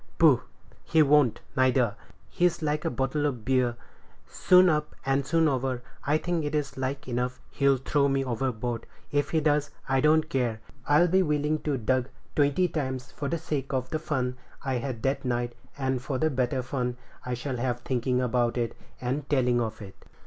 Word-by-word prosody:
"Poh! - - +6 0.4
he 160 -1 +4
won't, 145 -4 +4
neither; 130 -4 +3 0.3
he's 175 -2 +1
like 150 0 0
a - - +2
bottle 135 +4 0
of 125 -6 -4
beer, 130 -2 +2 0.5
soon 185 0 +5
up 150 -3 0
and 135 0 +1
soon 165 -1 +3
over. 130 -3 -1 0.2
I 150 +2 +2
think 170 0 -1
it 145 +1 -2
is 145 -2 -1
like 130 +1 -3
enough 125 0 -2
he'll 140 -1 +3
throw 140 +2 +1
me 135 -1 +1
overboard; 120 -1 -2 0.2
if 145 0 +1
he 160 - +2
does, 150 -1 +2 0.2
I 135 0 +2
don't 155 +1 +4
care; 125 -7 -1 0.3
I'd 155 +4 +4
be 190 +1 +5
willing 150 -2 +1
to 150 -3 -1
be 115 - -9
ducked 130 +1 +1 0.3
twenty 145 +5 +3
times 130 -6 -3
for 145 - -4
the 170 - 0
sake 140 -4 -3
of 130 +1 -2
the 155 - -1
fun 130 -5 -2 0.3
I 130 -2 0
had 120 -3 -5
that 135 +1 0
night, 120 -1 -1 0.2
and 130 -2 -1
for 130 +1 -2
the 155 +3 +1
better 130 0 0
fun 125 -1 -2 0.3
I 125 -1 -2
shall 125 +1 -4
have 120 0 -1
thinking 125 0 0
about 120 -1 +1
it 120 -1 -1 0.2
and 135 +3 -3
telling 125 -4 +2
of 110 -2 -4
it." 95 -1 -10
135 Hz, 190 wpm, -27 LUFS, 125-150 Hz, 0.5 s, Poh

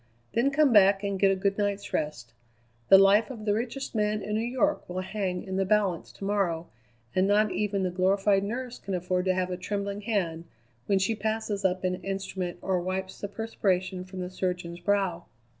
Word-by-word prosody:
Then 240 +4 +3
come 280 -2 +3
back 200 -1 +6
and 200 -1 -2
get 195 - +5
a 195 - +3
good 195 +2 0
night's 205 0 -2
rest. 145 -7 -3 0.6
The 195 - +10
life 195 +4 +5
of 225 -5 -7
the 205 - +2
richest 240 +5 -3
man 210 -1 0
in 210 - -3
New 215 - +1
York 260 +4 0
will 180 +1 -3
hang 185 -2 -3
in 190 -1 -4
the 195 - +2
balance 195 -3 +1
to 195 - -7
morrow, 185 -5 0 0.5
and 185 +1 +3
not 210 0 +3
even 205 -2 -1
the 185 - 0
glorified 195 +2 +2
nurse 245 +4 -4
can 195 -1 -4
afford 180 +1 -1
to 185 -1 +2
have 185 0 -1
a 180 - -2
trembling 200 +2 -3
hand 180 -7 -1 0.4
when 200 - +3
she 195 +4 +1
passes 215 -1 -2
up 185 0 +1
an 180 0 -1
instrument 195 -2 -3
or 185 -2 +1
wipes 185 +1 -4
the 200 - -2
perspiration 190 -4 -1
from 185 0 -7
the 180 0 -5
surgeon's 180 -2 -3
brow." 185 -2 0
195 Hz, 200 wpm, -28 LUFS, 185-210 Hz, 0.6 s, The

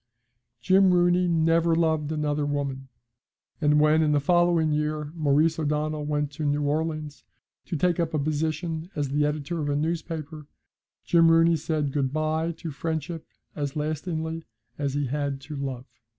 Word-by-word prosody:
Jim 190 0 +5
Rooney 175 +1 +3
never 165 0 +3
loved 160 -2 +1
another 150 -1 -1
woman, 140 -2 -3 0.7
and 150 0 +4
when, 155 +1 +4
in 150 -1 +2
the 145 - +3
following 170 0 +3
year, 150 0 -1
Maurice 155 0 +2
O'Donnell 150 0 -1
went 150 -1 -1
to 155 +2 -6
New 145 0 0
Orleans 155 0 -2 0.4
to 180 - -4
take 175 +2 +1
up 165 -1 0
a 155 - -1
position 155 +3 -2
as 145 -3 -1
the 145 +2 +1
editor 150 +3 -3
of 145 - -2
a 145 - 0
newspaper, 155 -1 -3 0.6
Jim 165 -1 +5
Rooney 165 0 +5
said 155 -2 -1
good 135 -3 0
bye 155 +2 0
to 165 0 -7
friendship 160 +2 -4 0.3
as 145 -2 -3
lastingly 160 +1 -3 0.3
as 140 -1 -2
he 145 0 0
had 140 +1 -2
to 150 +3 -8
love. 135 -3 -4
155 Hz, 160 wpm, -26 LUFS, 145-165 Hz, 0.7 s, Jim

